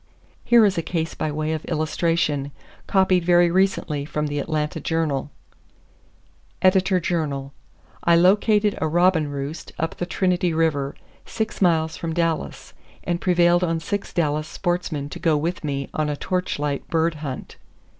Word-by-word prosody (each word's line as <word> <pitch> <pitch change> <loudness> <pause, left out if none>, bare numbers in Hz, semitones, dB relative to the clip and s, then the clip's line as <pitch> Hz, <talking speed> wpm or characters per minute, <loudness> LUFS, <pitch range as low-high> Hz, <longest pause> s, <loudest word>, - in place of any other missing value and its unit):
Here 235 -2 +6
is 190 -4 +1
a - - 0
case 160 -1 -3
by 155 - -2
way 155 +1 -2
of 155 - -4
illustration, 155 -3 0 0.4
copied 190 -2 +3
very 175 0 +4
recently 180 -6 +1
from 150 +1 -3
the 145 0 -2
Atlanta 150 +1 -2
Journal: 150 -3 -1 1.3
Editor 185 0 +4
Journal:—I 150 0 -2
located 205 +4 +4
a - - +1
robin 175 -1 +3
roost 145 +3 -6
up 165 0 -3
the 175 - -3
Trinity 180 -2 +1
River, 145 -4 0 0.3
six 220 -1 -4
miles 160 -3 +2
from 165 -1 -4
Dallas, 165 -1 -2 0.3
and 175 0 -2
prevailed 175 -1 +3
on 165 -2 0
six 200 +5 -4
Dallas 155 -3 0
sportsmen 175 -5 -2
to - - -8
go 160 -3 +2
with 165 +4 -2
me 140 -2 -2
on 155 -1 -1
a 145 - -2
torch 180 +3 -2
light 145 -1 -3
bird 165 0 +1
hunt. 135 -4 -6
165 Hz, 150 wpm, -23 LUFS, 150-180 Hz, 1.3 s, Here